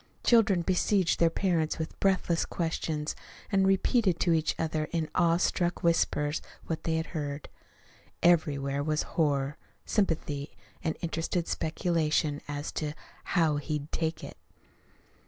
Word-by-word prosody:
Children 200 -7 +4
besieged 185 0 +2
their 170 - +5
parents 165 -3 0
with 160 0 -5
breathless 185 -3 +2
questions, 160 -2 -2 0.4
and 195 -1 +3
repeated 195 -1 +2
to 170 - +3
each 160 -1 +1
other 155 -1 -1
in 160 0 -2
awe 170 -1 +3
struck 175 0 0
whispers 150 -3 +1 0.2
what 160 - -4
they 160 - +1
had 160 0 0
heard. 145 -2 -4 0.7
Everywhere 145 -5 +3
was 155 0 0
horror, 145 -2 +1 0.3
sympathy, 155 -8 -1 0.3
and 160 -2 -1
interested 170 +1 -2
speculation 155 -2 0
as 145 0 -4
to 150 -1 -3 0.4
"how 160 -5 +3
he'd 150 +1 -4
take 160 0 -2
it." - - -8
160 Hz, 130 wpm, -29 LUFS, 150-175 Hz, 0.7 s, their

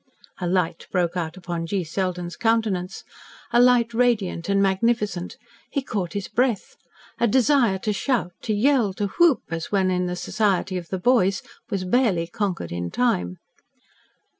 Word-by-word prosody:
A 180 - -2
light 175 -2 -1
broke 175 -2 0
out 170 -1 -3
upon 170 -2 -4
G. 190 +1 -1
Selden's 180 +1 -3
countenance 220 -6 0 0.5
a 240 - +6
light 245 -2 +4
radiant 225 -7 +1
and 200 0 +3
magnificent. 195 -1 0 0.3
He 280 - -2
caught 190 -9 -3
his 200 -2 -3
breath. 245 -4 0 0.4
A 235 - +3
desire 245 -3 +3
to 210 +2 -2
shout 210 -5 -1
to 220 - -1
yell 235 -3 +2
to 200 +1 -2
whoop, 340 -6 +5
as 165 -1 -4
when 190 -2 +2
in 180 0 0
the 180 - -3
society 195 -1 0
of 175 -2 -4
"the 190 - -2
boys," 195 -2 +2 0.3
was 195 -4 -2
barely 190 -5 +2
conquered 175 - -3
in 85 0 -3
time. 90 -5 0
195 Hz, 160 wpm, -23 LUFS, 175-230 Hz, 0.5 s, a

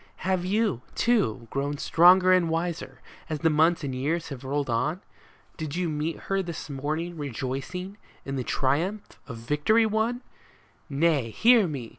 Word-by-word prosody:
Have 185 -1 +1
you, 205 - 0
too, 125 - +1
grown 140 +1 -2
stronger 185 +4 +5
and 180 -3 +3
wiser, 165 +1 -3 0.3
as 155 - -2
the 165 - +3
months 160 +2 +3
and 135 -2 -3
the 130 - -4
years 160 +5 -1
have 140 -3 -8
rolled 140 +1 -2
on? 145 +8 0 0.6
Did 155 -2 -5
you 180 -1 -1
meet 155 +2 -3
her 195 0 -1
this 170 -4 -6
morning 155 +5 -3
rejoicing 140 - -5 0.3
in 135 - -4
the 130 - -2
triumph 165 - -1
of 120 -5 -7
victory 150 - +2
won? 220 +3 0 0.7
Nay, 145 -4 +1
hear 225 - +5
me 135 -7 -5
160 Hz, 160 wpm, -26 LUFS, 140-185 Hz, 0.7 s, stronger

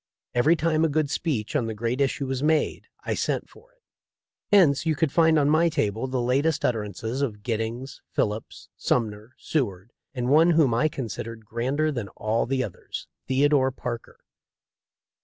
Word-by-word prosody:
Every 135 +8 +4
time 160 -1 +1
a 165 - +3
good 145 -1 0
speech 140 -8 -2
on 125 -6 +1
the 110 - -4
great 120 +5 -1
issue 140 +1 0
was 130 -1 -2
made 155 0 +1 0.2
I - - 0
sent - - -1
for - - -20
it. - - -39 0.7
Hence 170 -9 +5
you 160 -1 +1
could 155 -1 +1
find 160 0 +4
on 145 -1 +3
my 160 +3 +4
table 115 -6 -1
the 130 -1 -1
latest 135 +6 +1
utter 115 -3 +2
ances 110 +6 -4
of 105 -7 -2
Giddings, 120 +3 -3
Phillips, 105 +1 -3
Sumner, 110 0 -1
Seward, 105 - -2 0.2
and 125 -1 -2
one 160 +4 +6
whom 140 -7 +4
I 135 +7 +3
considered 115 -4 -6
grander 130 +8 0
than 120 -8 -4
all 110 +2 0
the 130 0 0
others 100 - -7
— - - -57
Theodore 135 0 +3
Parker. 120 -2 -6
130 Hz, 175 wpm, -25 LUFS, 115-155 Hz, 0.7 s, one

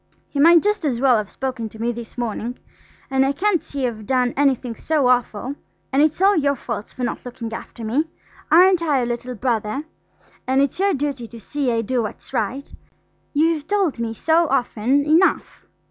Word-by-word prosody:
He 285 - -4
might 335 +3 +7
just 420 -2 0
as 260 -6 0
well 255 -2 +4
have 210 -2 -3
spoken 255 -4 -4
to 220 - -14
me 235 +1 0
this 235 0 -9
morning. 240 +1 -3 0.5
And 265 0 +3
I 270 +1 +1
can't 365 +3 +1
see 275 -2 -3
I've 215 -4 -4
done 250 -2 +1
anything 265 -4 +1
so 305 0 0
awful–and 250 +3 -1
it's 310 +1 +2
all 400 +1 +5
your 280 -2 +2
faults 235 -4 -6
for 255 - -6
not 240 - -3
looking 240 -2 -7
after 230 0 -8
me. 265 +9 +1 0.5
Aren't 360 +2 +6
I 305 -4 +1
your 250 - +1
little 240 +1 -4
brother? 230 +2 -1 0.6
and 260 +1 +2
it's 280 +4 +1
your 395 -2 +2
duty 275 -4 -3
to 230 0 -11
see 275 +4 -2
I 230 -1 +1
do 245 +2 -1
what's 215 - -7
right. 250 +7 -2 0.6
You've 310 0 +1
told 390 -11 0
me 225 -1 -3
so 325 +6 +2
often 255 +2 +1
enough." 325 +5 +2
260 Hz, 190 wpm, -21 LUFS, 235-300 Hz, 0.6 s, might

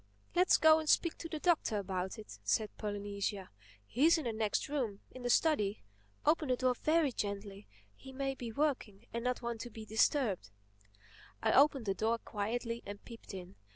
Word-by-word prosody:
"Humph!—Let's 360 +1 +4
go 315 0 +6
and 310 -1 -3
speak 335 - +3
to 330 - -6
the 315 - -3
Doctor 310 -9 +2
about 190 -1 -3
it," 215 - -10
said 215 -2 0
Polynesia. 205 -1 -3 0.3
"He's 305 - +4
in 315 - -3
the 235 -3 -2
next 215 -1 0
room—in 255 -3 -4
the 245 - -2
study. 230 -8 +2 0.4
Open 305 -1 +3
the 255 - +3
door 255 0 +2
very 310 +2 +2
gently—he 200 - -7
may 270 0 -2
be 240 -3 -6
working 240 -6 -1
and 235 0 -2
not 250 0 -1
want 235 -1 -3
to 240 - -6
be 220 -1 -9
disturbed." 220 - +1 0.9
I 220 - +3
opened 275 -2 +5
the 195 - +1
door 225 +4 +1
quietly 230 +2 -3
and 205 0 -9
peeped 230 -4 -10
in. 185 +1 -9
230 Hz, 175 wpm, -34 LUFS, 205-275 Hz, 0.9 s, go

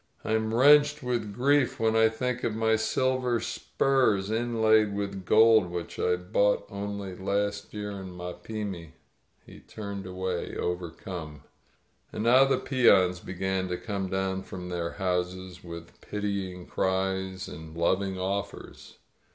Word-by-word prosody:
But - - -3
I - - +3
am 110 0 0
wrenched 145 +4 +5
with 120 -4 -2
grief 135 +4 +2
when 110 0 +2
I 115 0 +5
think 125 +2 -3
of 110 - -1
my 110 0 +2
silver 125 +2 +1
spurs 110 -9 +1
inlaid 110 -2 +2
with 100 -2 -4
gold, 110 -3 +5
which 85 -1 -6
I 90 - +2
bought 100 +3 +1
only 100 -1 -5
last 100 +2 -2
year 105 -1 -5
in 95 -2 -8
Mapimi!" 90 -1 -6 0.5
He - - -13
turned 100 -3 -7
away, 95 -1 -3
overcome. 85 -3 -5 0.7
And 105 - -4
now 125 +3 +6
the 135 - +2
peons 95 -9 +4
began 95 +1 -2
to 90 -1 -2
come 100 -3 -4
down 95 0 -1
from 90 -1 -8
their 85 -1 -3
houses, 90 -1 -3
with 85 -1 -10
pitying 100 -3 -4
cries 95 0 -1
and 80 +1 -9
loving 95 +3 +1
offers. 100 +2 -5
100 Hz, 140 wpm, -28 LUFS, 90-110 Hz, 0.7 s, now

